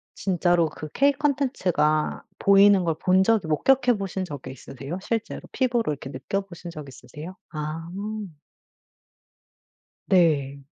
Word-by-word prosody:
진짜로 175 -3 +1
그 155 - -9
K 280 +1 +4
콘텐츠가 255 - 0 0.2
보이는 200 -1 +6
걸 165 -2 0
본 185 +1 +4
적이 210 -5 +2
목격해 245 - +3
보신 190 -1 -3
적이 140 -6 -7
있으세요? 135 +6 -7
실제로 225 +2 -3
피부로 240 - 0
이렇게 135 -1 -8
느껴 140 +10 -3
보신 175 -2 -10
적이 150 -4 -9
있으세요? 150 +8 -10 0.2
아. 155 +2 -5 2.2
네. 150 -7 +2
175 Hz, 270 characters per minute, -25 LUFS, 150-200 Hz, 2.2 s, 보이는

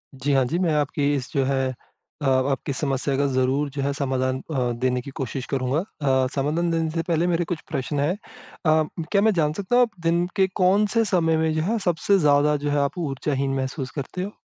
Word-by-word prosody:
जी, 135 +2 -1
हाँ 135 -1 +4
जी, 165 +7 -1
मैं 170 -4 +1
आपकी 145 0 +1
इस 130 -1 -3
जो 140 -3 +2
है 135 -1 +1 0.5
अ, - - -2
आपकी 135 +1 +1
समस्या 135 0 +1
का 140 - +2
ज़रूर 130 +3 +1
जो 140 0 -5
है 140 +1 0
समाधान 130 -2 -1
अ, 125 -4 0
देने 125 -1 0
की 140 - -9
कोशिश 130 -1 -4
करूँगा। 130 +3 0
अ, 135 -8 0
समाधान 160 +5 0
देने 165 -1 0
से 165 0 -1
पहले 170 +1 +1
मेरे 170 -1 +1
कुछ 165 -2 -3
प्रश्न 140 +2 -2
हैं 150 +6 +1 0.5
अ, 155 0 +4 0.3
क्या 200 -1 +4
मैं 220 0 +4
जान 155 -4 +1
सकता 200 +7 -1
हूँ 250 - +6
आप 220 -7 -4
दिन 170 +1 +2
के 190 -2 +3
कौन-से 205 +4 +3
समय 165 -5 +3
में 160 0 +1
जो 155 - 0
है 220 +8 0
सबसे 180 +3 +2
ज़्यादा 150 0 +4
जो 145 +1 -3
है, 145 - +1
आप 140 +6 -1
ऊर्जाहीन 140 -3 -1
महसूस 130 0 -3
करते 155 +6 -5
हो? 205 - -7
145 Hz, 220 wpm, -24 LUFS, 135-170 Hz, 0.5 s, हूँ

